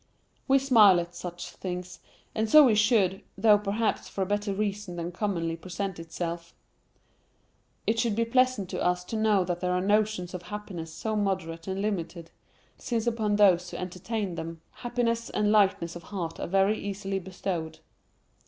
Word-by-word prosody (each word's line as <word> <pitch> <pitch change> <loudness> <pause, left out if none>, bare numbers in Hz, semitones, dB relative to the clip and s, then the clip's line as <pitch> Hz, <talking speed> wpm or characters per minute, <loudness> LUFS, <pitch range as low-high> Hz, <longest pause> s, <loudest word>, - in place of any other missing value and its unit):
We 270 0 +5
smile 225 -9 +6
at 175 0 -5
such 175 0 -7
things, 180 -1 -6 0.3
and 220 0 -1
so 305 +4 +9
we 240 - +4
should, 210 -3 +3 0.2
though 210 -2 +5
perhaps 210 +2 -1
for 195 - -2
a - - -1
better 205 +1 -1
reason 200 -2 -3
than 170 0 -4
commonly 175 -4 -2
presents 185 +2 -5
itself. 170 0 -5 1.3
It 225 +1 +1
should 230 -3 +1
be 230 +1 +1
pleasant 255 -4 +2
to - - -3
us 180 0 +1
to 225 - -6
know 215 -3 +3
that 175 -1 -3
there 180 0 0
are 180 - +1
notions 205 -2 +1
of 180 - -5
happiness 180 -3 -7
so 220 +6 -3
moderate 185 -5 -2
and 190 +1 -2
limited, 170 -5 -3 0.5
since 230 -2 -2
upon 220 -3 +1
those 185 -4 +4
who - - -6
entertain 185 +2 -4
them, 165 -1 -6
happiness 235 -1 -2
and 210 0 +1
lightness 190 -5 +3
of 175 - -7
heart 170 -4 -5
are - - -3
very 195 +4 +2
easily 195 -1 -3
bestowed. 175 -3 -4
195 Hz, 170 wpm, -28 LUFS, 175-215 Hz, 1.3 s, so